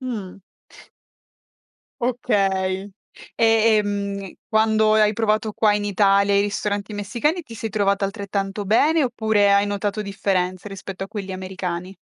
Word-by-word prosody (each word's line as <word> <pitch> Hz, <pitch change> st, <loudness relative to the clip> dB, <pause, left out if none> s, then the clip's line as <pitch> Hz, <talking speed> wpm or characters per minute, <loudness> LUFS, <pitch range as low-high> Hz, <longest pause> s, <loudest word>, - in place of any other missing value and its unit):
Mh. 210 Hz, -7 st, -6 dB, 1.6 s
Okay. 195 Hz, -5 st, 0 dB, 0.5 s
E 230 Hz, -, +4 dB, 0.3 s
e 210 Hz, -, +2 dB
mh 200 Hz, -2 st, -4 dB, 0.2 s
quando 220 Hz, 0 st, +3 dB
hai 215 Hz, -1 st, +4 dB
provato 215 Hz, 0 st, 0 dB
qua 210 Hz, -2 st, +3 dB
in 205 Hz, -, -2 dB
Italia 200 Hz, 0 st, +3 dB
i 200 Hz, -, +4 dB
ristoranti 205 Hz, 0 st, -2 dB
messicani 250 Hz, -, -1 dB
ti 235 Hz, -, -12 dB
sei 225 Hz, 0 st, -5 dB
trovata 200 Hz, -1 st, +1 dB
altrettanto 200 Hz, 0 st, -4 dB
bene 295 Hz, +9 st, +3 dB
oppure 220 Hz, -4 st, +2 dB
hai 200 Hz, +1 st, +4 dB
notato 205 Hz, +1 st, -2 dB
differenze 190 Hz, -1 st, -2 dB
rispetto 195 Hz, -1 st, -7 dB
a -, -, -7 dB
quelli 195 Hz, -2 st, -6 dB
americani? 185 Hz, 0 st, -5 dB
205 Hz, 135 wpm, -22 LUFS, 195-215 Hz, 1.6 s, E